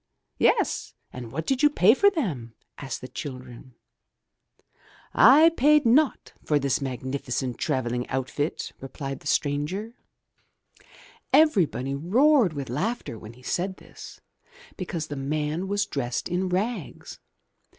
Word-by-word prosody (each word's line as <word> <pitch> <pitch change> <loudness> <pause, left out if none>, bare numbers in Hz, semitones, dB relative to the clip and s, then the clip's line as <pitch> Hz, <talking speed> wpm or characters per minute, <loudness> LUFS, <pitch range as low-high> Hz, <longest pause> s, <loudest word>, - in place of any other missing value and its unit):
"Yes, - - +1 0.2
and 120 -3 -8
what 160 +5 -4
did 265 -1 0
you 295 - +6
pay 215 -7 +5
for 400 +10 +5
them?*' 155 - -4 0.2
asked 135 -4 -6
the 130 - -7
children. 130 -2 -9 1.4
"I 295 +7 +7
paid 300 -2 +3
naught 270 +5 +2
for 150 - +2
this 140 -1 0
magnificent 130 -1 -4
traveling 125 -1 -2
outfit," 135 +4 -3
replied 135 0 -6
the - - -10
stranger. 150 +12 -1 1.4
Everybody 180 - +3
roared 220 - +3
with 140 -3 -5
laughter 175 - -3
when 110 +2 -11
he 125 +2 -18
said 185 +7 -2
this, - - -13 0.6
because 175 -4 -4
the 145 - -6
man 150 +5 -2
was 205 +1 0
dressed 120 -4 -3
in 180 +1 -1
rags! 195 - -4
150 Hz, 125 wpm, -25 LUFS, 130-215 Hz, 1.4 s, I